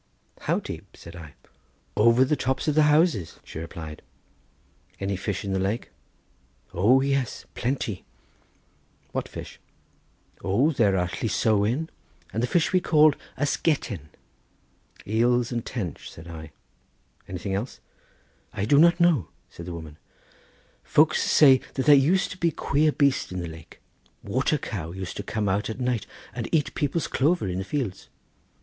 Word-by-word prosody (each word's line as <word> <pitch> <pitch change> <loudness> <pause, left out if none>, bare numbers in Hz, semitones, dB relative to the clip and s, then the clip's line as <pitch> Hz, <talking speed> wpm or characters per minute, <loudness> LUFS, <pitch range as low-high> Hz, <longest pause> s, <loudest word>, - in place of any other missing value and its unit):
"How - - 0
deep?" - - -9
said 85 +1 -11
I. 80 -5 -11 0.6
"Over 115 +4 +5
the 150 - +1
tops 130 0 -2
of 150 - +3
the 155 - +4
houses," 150 - +2
she - - -8
replied. 80 -1 -8 1.0
"Any 100 0 -1
fish 95 +1 -3
in 100 - -2
the 95 - 0
lake?" 100 +5 -2 0.8
"O 115 +10 +4
yes! 135 -2 -1
plenty." 120 -6 -2 1.1
"What - - -3
fish?" - - -9 0.8
"O 115 - +2
there 105 -9 +2
are 90 -1 +1
llysowen, 110 - 0 0.5
and 110 - -1
the 125 - +1
fish 170 +6 +1
we 185 - +4
call 155 -3 +5 0.2
ysgetten." 130 - -1 1.0
"Eels 120 +3 +2
and 120 -2 -2
tench," 95 - -5
said 80 +2 -12
I; 80 -2 -9 0.8
"anything 95 +2 -4
else?" 105 +7 -3 0.7
"I 100 - -2
do 140 +6 +5
not 170 +2 +5
know," 170 - +3 0.2
said 85 - -10
the 90 - -5
woman; 80 -2 -9 0.8
"folks 155 +1 +3
say 135 -4 +6
that 130 - -1
there 150 - +8
used 155 +8 +3
to 185 - -9
be 170 - +3
queer 150 0 +1
beast 140 -7 +1
in 90 - -3
the 85 - -4
lake, 80 -1 -12 0.4
water 130 +8 +1
cow 85 - -5
used 95 -1 -6
to - - -2
come 105 0 -2
out 100 +3 0
at 110 - -5
night 125 -4 -1 0.3
and 120 -2 -4
eat 155 -3 +1
people's 155 0 -1
clover 155 - +1
in 90 0 -2
the - - -2
fields." 115 -4 -4
115 Hz, 155 wpm, -25 LUFS, 95-145 Hz, 1.1 s, there